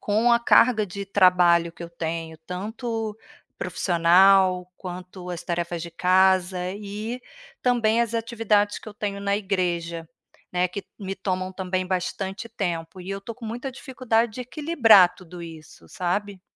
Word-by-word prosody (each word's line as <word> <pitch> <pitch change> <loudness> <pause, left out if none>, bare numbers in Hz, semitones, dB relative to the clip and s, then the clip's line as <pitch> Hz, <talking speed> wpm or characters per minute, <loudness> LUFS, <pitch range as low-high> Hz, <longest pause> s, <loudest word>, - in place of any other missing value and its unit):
com 220 +4 +2
a 235 - +5
carga 235 -2 +4
de 200 +2 -6
trabalho 180 -3 +4
que 170 - -11
eu 170 - -7
tenho, 165 -1 -4
tanto 215 +6 -4 0.4
profissional 180 +1 +4
quanto 180 0 -8
as 175 - -5
tarefas 170 0 -3
de 170 - -7
casa 185 +1 +3
e 210 +4 -6 0.4
também 235 -2 +2
as 235 -1 0
atividades 225 -3 +1
que - - -11
eu 205 - -11
tenho 200 -1 -4
na 200 0 +1
igreja, 175 -5 -2 0.4
né, 180 0 +2
que 195 +2 -6
me 195 -1 -4
tomam 185 -1 -3
também 185 -1 -2
bastante 190 +3 -3
tempo, 180 -5 -4
e 180 - -10
eu 195 - -3
estou 215 +4 -8
com 240 - -10
muita 240 +5 -5
dificuldade 245 -4 -1
de 250 - -7
equilibrar 245 - +5
tudo 180 -1 -12
isso, 160 - -11
sabe? 190 - -3
190 Hz, 150 wpm, -24 LUFS, 180-215 Hz, 0.4 s, a